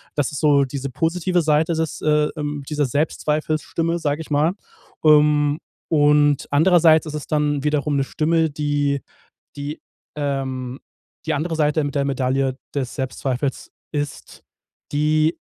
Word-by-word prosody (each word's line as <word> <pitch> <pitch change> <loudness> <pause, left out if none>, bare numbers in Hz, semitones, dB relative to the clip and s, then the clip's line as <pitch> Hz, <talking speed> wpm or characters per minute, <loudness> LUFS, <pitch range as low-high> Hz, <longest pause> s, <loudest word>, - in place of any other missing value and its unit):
Das 145 -2 0
ist 145 - -3
so 140 -2 +4
diese 140 +1 -5
positive 170 +5 0
Seite 155 +1 +2
des 160 -1 -2
äh 150 0 +3
ähm 145 -1 -3
dieser 150 -1 0
Selbstzweifelsstimme, 155 +4 -1
sage 145 -1 -1
ich 155 - -10
mal. 150 +3 +2 0.5
Ähm, 150 -1 +4 0.3
und 145 -2 +3
andererseits 160 +1 +5
ist 155 - -6
es 150 -2 -5
dann 150 -2 0
wiederum 150 -1 0
'ne 135 - +2
Stimme, 160 +3 +1
die 145 -1 -1 0.6
die 145 +2 -5 0.4
ähm 135 -3 -3 0.5
die 160 - 0
andere 160 +2 -2
Seite 150 0 +2
mit 145 - -4
der 140 - +2
Medaille 135 -1 0 0.2
des 130 -4 -3
Selbstzweifels 130 0 -3 0.2
ist 145 -1 -5 0.5
die 155 +2 +2
150 Hz, 140 wpm, -21 LUFS, 140-155 Hz, 0.6 s, andererseits